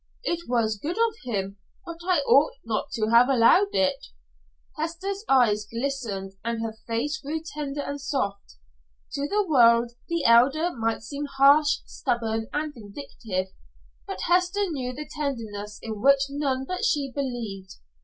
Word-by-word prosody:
"It 340 - -3
was 220 -4 +1
good 335 - -4
of 455 -1 +2
him, 195 -4 -3 0.3
but 335 0 -8
I 360 -5 +3
ought 280 +2 +4
not 225 -2 -2
to 215 -1 0
have 240 +2 +6
allowed 275 - +4
it." 190 - +1 0.7
Hester's 335 +6 -4
eyes 215 -6 +3
glistened 230 -6 -3
and 230 0 -2
her 225 -1 -3
face 265 +7 -1
grew 300 +3 -3
tender 290 -2 -4
and 285 0 -5
soft. 200 - -3 0.6
To 280 0 -2
the 415 +4 +1
world, 235 -5 +5 0.2
the 335 -1 -1
Elder 275 +9 +5
might 225 -1 -1
seem 285 +5 -5
harsh, 285 +2 +4
stubborn, 225 -2 -2
and 300 0 -2
vindictive, 205 -4 -6 0.5
but 390 - -5
Hester 365 +3 +2
knew 255 -4 -3
the 295 +4 -7
tenderness 225 -9 -5
in 220 -2 -5
which 275 +1 +5
none 275 -2 -1
but 365 - -3
she 280 -3 +1
believed. 230 -9 -4
270 Hz, 150 wpm, -25 LUFS, 225-300 Hz, 0.7 s, have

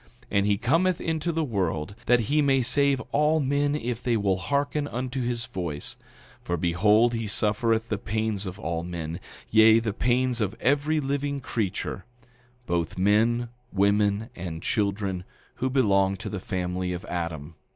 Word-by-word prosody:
9:21 - - -28 0.2
And 100 0 +2
he 100 -1 +2
cometh 165 - +2
into 165 +1 -1
the 165 0 0
world 95 - -2
that 120 0 +5
he 145 +8 +2
may 135 -2 +3
save 140 +2 +3
all 150 +2 +3
men 145 +1 +1
if 120 -4 -3
they 120 -2 +1
will 100 -3 +1
hearken 145 - -1
unto 130 0 -3
his 120 -1 -2
voice; 85 -8 -5 0.5
for 85 - -2
behold, 105 +8 +3
he 115 -2 -2
suffereth 110 +2 +1
the 105 - -1
pains 110 -2 -2
of 95 +1 -6
all 85 -5 -3
men, 85 -1 -5 0.3
yea, 110 0 +7
the 115 -3 -1
pains 125 +1 +1
of 105 +1 -1
every 145 +4 +2
living 140 0 -2
creature, 105 -6 -3 0.6
both 85 -4 -1
men, 115 +5 +2 0.2
women, 100 +3 +2
and 85 -2 -6
children, 100 -3 -1 0.3
who 130 +2 0
belong 100 -7 +3
to - - -6
the 100 - -4
family 90 0 -2
of 90 +4 -6
Adam. 85 -4 -4
110 Hz, 160 wpm, -26 LUFS, 95-130 Hz, 0.6 s, yea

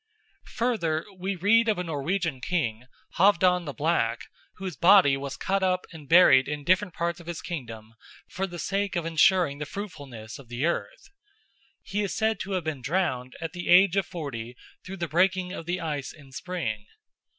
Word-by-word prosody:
Further, 210 -11 0
we 190 +2 -3
read 225 +6 +3
of 215 - +1
a 180 - -2
Norwegian 165 -2 -2
king, 125 -8 -2 0.3
Halfdan 180 -2 +4
the 145 - -4
Black, 145 -7 0 0.3
whose 185 -3 -6
body 180 -6 +6
was 140 0 -5
cut 195 +1 0
up 185 -1 +1
and 150 -4 -12
buried 140 -7 +7
in 150 0 -4
different 185 +3 +1
parts 170 +1 -2
of 170 - -14
his 170 -2 -4
kingdom 115 -9 -7 0.3
for 195 +1 -3
the 175 -1 -8
sake 195 +3 -2
of 170 -2 -1
ensuring 165 -2 +3
the 150 - -4
fruitfulness 140 - -8
of 135 - -14
the 120 +5 -2
earth. 395 - -3 0.7
He 200 +2 -2
is 200 - -2
said 220 -1 +1
to 195 - -4
have 185 -2 -1
been 155 -4 -4
drowned 135 -4 -1
at 165 +1 -5
the 175 -1 -5
age 185 +1 +6
of 195 - +1
forty 125 -9 -6 0.3
through 195 +1 -8
the 170 -1 -3
breaking 185 +3 +1
of 165 - -7
the 180 +1 -1
ice 150 -5 -4
in 140 -3 -16
spring. 130 - -4
170 Hz, 185 wpm, -26 LUFS, 140-190 Hz, 0.7 s, buried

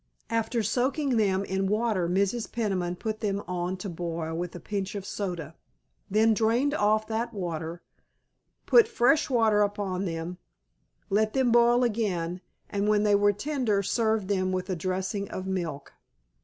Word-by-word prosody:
After 230 0 0
soaking 260 +4 +1
them 195 -3 +2
in 190 0 -1
water 210 -4 +1
Mrs. 200 +5 0
Peniman 190 -6 -1
put 215 +3 -4
them 205 -2 -1
on 180 +1 -2
to 185 - -6
boil 165 -2 -4
with 175 +1 -4
a - - -6
pinch 200 +1 -4
of 200 -1 -5
soda, 175 -8 -4 0.6
then 220 +3 +4
drained 235 +6 +2
off 215 -4 +2
that 230 +1 -3
water, 170 -2 -4 0.8
put 465 -2 +6
fresh 300 - +3
water 225 -4 +3
upon 200 -2 -1
them, 170 +1 -4 0.7
let 215 +2 +2
them 260 -3 +2
boil 240 +1 +5
again, 185 -7 -1 0.3
and 200 0 -1
when 210 0 +3
they 210 -1 +3
were 205 0 +5
tender 225 -3 -1
served 220 0 +1
them 185 -2 0
with 185 +1 -2
a - - 0
dressing 190 +3 -2
of 185 - -5
milk. 170 -7 -4
205 Hz, 155 wpm, -27 LUFS, 185-225 Hz, 0.8 s, put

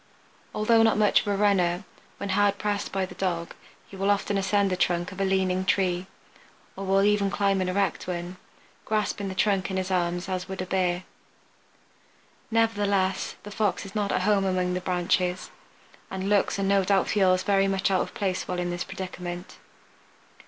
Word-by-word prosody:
Although 225 +2 +4
not 225 -2 +4
much 210 -1 +4
of - - -10
a 205 - +1
runner, 190 -3 +2 0.3
when 200 - -5
hard 200 +1 +2
pressed 205 -1 -2
by 195 -1 0
the - - -11
dog 170 -3 -2 0.3
he - - -12
will 195 +1 0
often 205 0 +1
ascend 195 0 +1
the - - +1
trunk 175 0 0
of 195 0 -6
a - - +3
leaning 190 -1 +1
tree, 185 -1 +1 0.7
or 195 - -5
will 195 +1 +3
even 205 -1 +3
climb 195 -1 +1
an 185 - -1
erect 195 0 -1
one, 175 0 -4 0.5
grasping 210 -2 -1
the 190 - -5
trunk 195 -1 +1
in 190 - -2
his 190 0 -2
arms 175 0 0
as 185 -1 -3
would 190 - -6
a 185 - -2
Bear. 180 -1 0 1.5
Nevertheless 205 -4 +1
the 205 - -9
Fox 210 -1 -1
is 195 - -10
not 205 -2 -1
at - - 0
home 205 -1 +3
among 185 -1 0
the 180 - -2
branches, 180 0 0 0.6
and 190 0 -4
looks 205 -1 +2
and 195 -1 0
no 195 0 +3
doubt 195 0 +2
feels 185 -2 +3
very 195 -1 +3
much 195 +1 0
out 185 - +3
of - - -5
place 190 -3 -2
while 180 - -2
in 175 0 -2
this 175 0 -3
predicament. 180 -1 -7
190 Hz, 190 wpm, -26 LUFS, 185-200 Hz, 1.5 s, Although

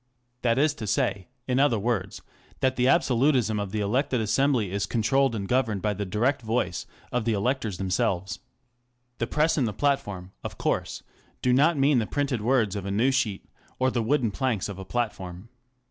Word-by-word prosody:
That 115 -1 +2
is 145 +2 +3
to 110 - -3
say, 100 -2 0 0.2
in 130 0 +1
other 140 -5 +4
words, 100 -3 -2 0.4
that 130 0 +2
the 125 0 +2
absolutism 130 -6 +3
of 100 -1 -3
the 105 0 -1
elected 125 +5 +1
assembly 115 -2 +1
is 100 +1 -1
controlled 120 +4 +2
and 100 -2 -3
governed 115 -5 0
by 105 -1 +1
the 100 0 -4
direct 120 +9 +1
voice 110 -6 -2 0.2
of 125 -2 0
the 115 0 +1
electors 110 -2 -1
them 95 0 -3
selves. 90 +1 0 0.8
The 115 - 0
Press 155 +3 +1
and 125 - +2
the 105 - -3
Platform, 100 -9 -1
of - - -6
course, - - -2 0.4
do 125 - +3
not 150 +5 +4
mean 135 -1 +4
the 110 - -1
printed 140 -5 -1
words 115 -4 +2
of 100 -1 -4
a - - -2
news 115 +7 +2
sheet 110 -7 -1 0.3
or 130 0 +2
the 120 - 0
wooden 120 -1 +1
planks 120 -3 -1
of 100 -2 -7
a 95 - -7
platform. 95 -3 -4
115 Hz, 190 wpm, -26 LUFS, 100-130 Hz, 0.8 s, other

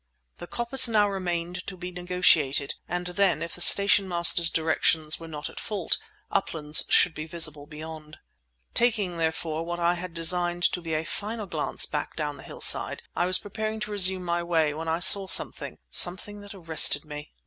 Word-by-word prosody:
The 175 - -9
coppice 240 +5 +2
now 215 -3 +2
remained 180 -2 -5
to 190 - -7
be 180 0 -8
negotiated, 175 -6 +1
and 180 0 -4
then, 180 -2 0
if 170 - -7
the 175 - -8
station 200 +1 +6
master's 170 -1 +3
directions 160 -1 0
were 165 - -10
not 150 -2 -7
at - - -10
fault, 205 -6 -3 0.3
"Uplands" 150 -1 -2
should 175 - +4
be 155 0 -8
visible 155 -4 0
beyond. 155 0 -11 0.6
Taking, 210 -8 +1
therefore, 160 0 -3
what 175 +1 -6
I 170 0 +1
had 175 -1 -8
designed 175 +1 0
to 180 - -5
be 165 -2 -4
a 155 - -2
final 210 +6 -5
glance 160 -5 -3
back 150 -1 -5
down 150 -2 -5
the - - -13
hillside, - - +2
I 175 - 0
was 185 0 +5
preparing 215 +1 -6
to 210 - -5
resume 190 -2 +3
my 175 0 -2
way 165 -3 0
when 160 +2 -7
I 160 0 -1
saw 195 +1 +6
something—something 190 +2 +1
that 205 0 -12
arrested 160 -4 +1
me. 150 0 -10
175 Hz, 180 wpm, -25 LUFS, 160-190 Hz, 0.6 s, station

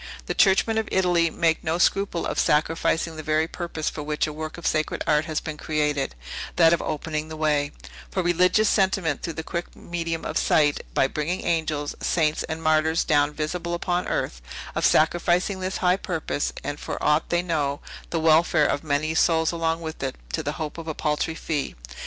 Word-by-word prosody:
The - - -2
churchmen 215 +3 +4
of 220 - -3
Italy 175 -3 +3
make 165 0 +1
no 160 +2 0
scruple 185 -1 +1
of - - -2
sacrificing 160 +1 +1
the - - -4
very 155 +1 +1
purpose 170 -3 -5
for 150 - -2
which 150 0 -1
a 155 - -5
work 155 +2 -6
of 170 - -9
sacred 155 0 0
art 150 +1 +2
has 155 -1 -1
been 155 -1 -6
created; 150 - -1 0.4
that 165 -1 +6
of 170 - +1
opening 155 0 -3
the 160 0 -7
way; 150 -2 +1 0.4
for 185 - -1
religious 180 +5 +3
sentiment 190 -7 +1
through 165 - -4
the 160 - -3
quick 170 +1 -5
medium 165 -1 -4
of - - 0
sight, 145 -2 +2
by - - +4
bringing 155 +6 -2
angels, 155 -3 -1
saints, 155 -3 +1
and 160 +1 -5
martyrs 155 +1 +3
down 145 -2 +3
visibly 170 +3 -3
upon 175 +1 -1
earth; - - -2 0.3
of - - +3
sacrificing 175 +4 +2
this 185 0 -2
high 180 +1 +4
purpose, 165 -6 -2
and, 145 0 -4
for - - -5
aught 150 +1 +2
they 175 0 +1
know, 145 -5 -1 0.3
the 165 - -1
welfare 160 0 +4
of 145 - 0
many 155 +1 0
souls 160 0 +3
along 165 -1 -1
with 160 -1 -6
it, 135 -1 -2 0.2
to - - 0
the - - -3
hope 155 +1 -5
of 165 - -8
a 160 - -3
paltry 150 +1 -1
fee. 150 -4 -3
160 Hz, 195 wpm, -25 LUFS, 150-175 Hz, 0.4 s, that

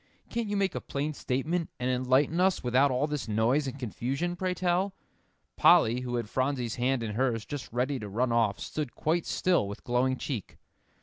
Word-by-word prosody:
"Can't 235 -2 -1
you 205 0 -1
make 195 -2 +1
a - - -3
plain 145 +2 -3
statement, 155 +6 -1
and 125 +1 0
enlighten 130 +6 +2
us 190 0 +2
without 130 +3 +4
all 130 +2 +1
this 150 -5 -3
noise 115 +7 +2
and 135 +1 -5
confusion, 135 - -2
pray 185 0 -1
tell?" 185 +2 0 0.6
Polly, 115 +3 +5
who 125 -1 -3
had 120 -3 -2
Phronsie's 130 -1 -1
hand 125 0 +1
in 110 -2 -3
hers, 115 -2 0
just 145 -4 -6
ready 130 +3 0
to 105 -2 -6
run 120 +5 0
off, 115 -4 +2
stood 150 -6 -4
quite 165 +2 0
still 175 - +2
with 100 - -8
glowing 130 +2 +1
cheek. 125 -9 -5
130 Hz, 190 wpm, -29 LUFS, 120-155 Hz, 0.6 s, Polly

